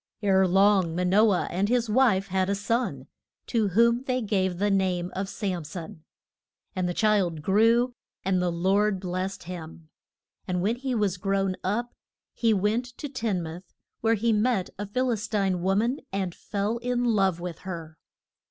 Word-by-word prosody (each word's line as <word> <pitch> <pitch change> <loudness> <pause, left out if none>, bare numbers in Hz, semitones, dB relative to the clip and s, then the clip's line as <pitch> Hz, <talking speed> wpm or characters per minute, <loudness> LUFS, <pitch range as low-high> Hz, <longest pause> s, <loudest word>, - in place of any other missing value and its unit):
Ere 190 -1 +4
long 190 -2 +3
Ma 180 - 0
no 205 +5 +4
ah 185 - +1
and 195 +4 0
his 240 -1 +2
wife 215 -4 +3
had 190 0 0
a 200 - +1
son, 230 +5 -1 0.4
to 225 -4 +1
whom 235 +5 +3
they 255 -1 0
gave 190 -5 0
the 205 +2 +1
name 185 -2 0
of 195 +1 -3
Sam 185 -6 -3
son. 160 0 -8 0.7
And 180 -1 0
the 175 - -3
child 195 -8 +1
grew, 230 +6 +3 0.3
and 185 -1 +2
the 180 -1 +1
Lord 195 +4 +1
blest 185 +1 -4
him. 165 -2 -9 0.6
And 180 -1 -1
when 225 +5 +1
he 260 0 -2
was 205 -4 0
grown 195 0 0
up 235 +6 -1 0.4
he 230 -2 +2
went 210 +4 +1
to 290 - -5
Tin 225 -9 -2
muth, 170 +2 -9 0.2
where 225 0 +2
he 225 +2 +1
met 210 -3 +1
a 205 - -3
Phil 250 +5 0
is 210 -2 -2
tine 195 -4 0
wo 190 +2 +1
man 235 +7 +1
and 190 -2 -2
fell 205 +5 -3
in 245 0 -1
love 195 -6 +2
with 175 -2 -6
her. 165 -4 -7
195 Hz, 180 wpm, -26 LUFS, 180-225 Hz, 0.7 s, Ere